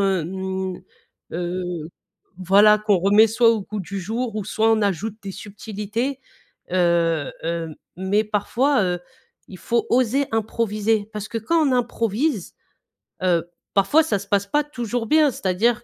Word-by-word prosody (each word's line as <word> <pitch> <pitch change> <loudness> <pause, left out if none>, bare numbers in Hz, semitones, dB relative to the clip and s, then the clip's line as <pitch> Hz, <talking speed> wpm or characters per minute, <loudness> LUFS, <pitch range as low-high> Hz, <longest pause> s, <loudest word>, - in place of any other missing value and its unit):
hem, 190 0 -2 0.5
heu, 175 -1 -3 0.5
voilà 205 +3 +5
qu'on 210 -3 +2
remet 205 +4 +5
soit 230 +1 +4
au 220 -3 0
goût 210 +1 -5
du 195 +2 -5
jour 225 +4 -3
ou 210 - -3
soit, 220 +2 +1
on 220 -1 +3
ajoute 205 +2 -1
des 195 -1 -6
subtilités, 215 +6 -4 0.5
heu, 170 -4 +1
hem, 165 -1 -3 0.2
mais 190 +3 +1
parfois, 220 +5 +1
heu, 180 -1 -1 0.5
il 185 - -10
faut 235 0 0
oser 255 +3 +2
improviser 220 -1 0
parce 210 -1 -5
que 230 - -3
quand 315 +7 +2
on - - +1
improvise, 235 - -1 0.7
heu, 175 -2 +1 0.3
parfois 205 +12 +4
ça 205 -11 0
se 200 - -10
passe 200 -1 +1
pas 295 +6 +1
toujours 240 -5 -4
bien 305 -2 +4
c'est-à-dire 220 +5 0
210 Hz, 150 wpm, -22 LUFS, 190-230 Hz, 0.7 s, voilà